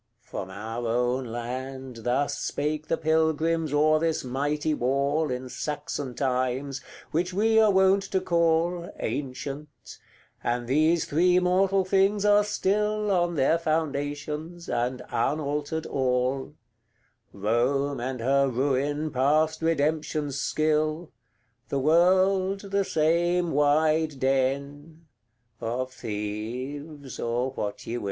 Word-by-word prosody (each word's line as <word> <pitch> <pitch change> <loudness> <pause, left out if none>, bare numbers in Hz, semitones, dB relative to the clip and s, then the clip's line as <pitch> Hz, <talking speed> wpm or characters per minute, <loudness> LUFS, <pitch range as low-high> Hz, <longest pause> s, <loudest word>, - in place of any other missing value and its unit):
From 95 - -6
our 110 +5 -5
own 125 +3 0
land 130 +2 -6
Thus 125 +5 0
spake 150 +1 -2
the 165 - 0
pilgrims 160 0 +1
o'er 155 +1 +4
this 165 0 0
mighty 145 +4 -1
wall 140 +4 0
In 125 0 -4
Saxon 145 -1 -4
times, 130 +1 -1 0.3
which 180 +3 -1
we 220 +2 +4
are 220 -1 +5
wont 190 0 +4
to 190 - +1
call 170 0 +1
Ancient; 140 +3 -5 0.4
and 120 0 -1
these 155 +5 +3
three 180 +4 +3
mortal 190 +1 +2
things 195 +2 +2
are 205 0 +5
still 210 +1 0
On 175 -2 +1
their 150 +4 +3
foundations, 155 +1 -3
and 125 +1 -1
unaltered 150 +4 -1
all; 130 +2 -1 0.8
Rome 125 +7 0
and 125 0 -4
her 140 +3 +3
Ruin 140 +4 0
past 150 +5 +2
Redemption's 155 -2 0
skill, 155 +3 0 0.6
The 140 - -1
World, 185 +6 +3
the 200 0 +2
same 175 0 +1
wide 155 0 +2
den 140 +4 -1 0.5
of 130 +3 -3
thieves, 125 +7 -5
or 120 +3 -1
what 105 -5 -5
ye 120 - -3
will. - - -3
145 Hz, 115 wpm, -26 LUFS, 130-165 Hz, 0.8 s, are